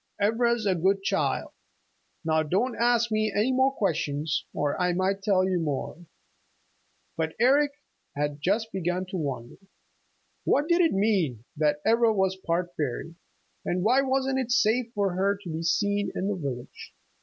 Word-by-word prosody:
Ivra's 230 +2 +1
a 195 - +3
good 190 +3 +1
child. - - 0 0.7
Now 160 -1 +2
don't 195 - 0
ask 235 -1 +2
me 215 0 +1
any 215 +5 +1
more 260 +1 +3
questions, 155 - -1
or 145 -1 -1
I 180 0 +2
might 190 +2 0
tell 190 -2 +2
you 185 -2 0
more." 160 +2 -4 1.1
But 160 -1 -2
Eric 280 +4 +4 0.4
had 145 0 -2 0.3
begun 180 0 -1
to 190 - -4
wonder. 135 -7 -4 0.9
What 290 +2 +2
did 340 +1 +4
it 330 - +3
mean, 190 - +1
that 150 -1 +1
Ivra 230 0 +4
was 190 -2 +1
part 175 -1 -2
fairy? 150 +3 -3 0.5
And 180 0 -1
why 250 +6 +4
wasn't 265 0 0
it 255 -2 -2
safe 245 -1 +2
for 200 -3 +1
her 200 +2 +1
to 175 - -7
be 160 +1 -3
seen 205 +4 0
in 195 - -1
the 205 - -1
village? 135 -8 -7
195 Hz, 155 wpm, -27 LUFS, 165-230 Hz, 1.1 s, Eric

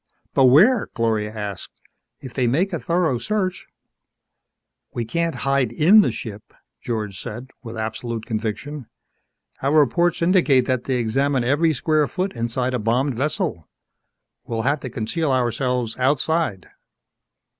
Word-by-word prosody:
"But 135 - +5
where?" 195 - +5
Gloria 110 -2 0
asked. 105 -3 -6 0.5
"If 130 - -9
they 130 -3 +1
make 175 - +1
a 170 - -1
thorough 165 -7 0
search 190 - -2 0.7
" - - -55
"We 120 - -2
can't 170 +7 -1
hide 135 -4 +2
in 180 - +6
the - - +1
ship," 105 -4 -8 0.3
George 105 -5 -4
said, 120 +4 -8
with 115 -2 -8
absolute 110 +1 -4
conviction. 115 +4 -4 0.7
"Our 140 +3 +2
reports 170 +5 +2
indicate 165 -8 +4
that 130 -2 -1
they 130 - 0
examine 130 +3 +1
every 145 +6 +2
square 155 -1 +1
foot 185 +4 -3
inside 120 +2 -2
a 125 - 0
bombed 125 +6 +1
vessel. 150 - -2 0.7
We'll 115 -1 -3
have 140 +4 +1
to 130 - -6
conceal 130 +7 -2
ourselves 125 -2 0
outside." 140 - 0
130 Hz, 140 wpm, -22 LUFS, 115-155 Hz, 0.7 s, in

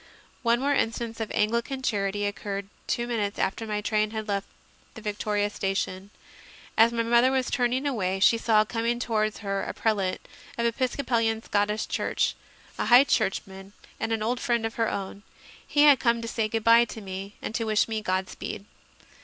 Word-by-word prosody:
One 235 -1 +2
more 280 +2 +1
instance 230 -3 -1
of 225 - -3
Anglican 235 +5 0
charity 205 -3 0
occurred 200 -1 -4 0.2
two 235 - 0
minutes 215 -4 -2
after 215 +4 -1
my 210 -1 -2
train 215 0 +1
had 220 0 -5
left 200 -1 -2 0.5
Victoria 210 -1 -1
station. 195 -1 -2 0.7
As 225 +1 +6
my 230 -1 0
mother 235 +2 +4
was 260 -1 0
turning 250 +1 +1
away, 195 -9 -1
she 230 +4 +5
saw 215 -2 +3
coming 230 +2 -1
towards 215 -3 -1
her 195 0 -1
a - - -5
prelate 200 -4 -1 0.3
of 235 - 0
the 235 - +4
Episcopalian 230 -3 0
Scottish 210 +1 0
Church, - - 0 0.4
a - - 0
High 245 +2 +8
Churchman 195 -5 -2 0.3
and 225 - -2
an 220 -1 0
old 240 +3 0
friend 235 -2 0
of 225 - -3
her 225 -2 0
own. 200 0 -5 0.5
He 290 - +3
had 290 -3 +7
come 235 -1 +2
to - - -4
say 225 -1 -1
good 225 0 -2
bye 230 +1 +6
to 230 - -8
me 195 0 -7
and - - -5
to 225 0 -1
wish 215 -2 +2
me 220 -1 -2
God 185 -2 -1
speed. 200 - -7
220 Hz, 185 wpm, -26 LUFS, 205-235 Hz, 0.7 s, High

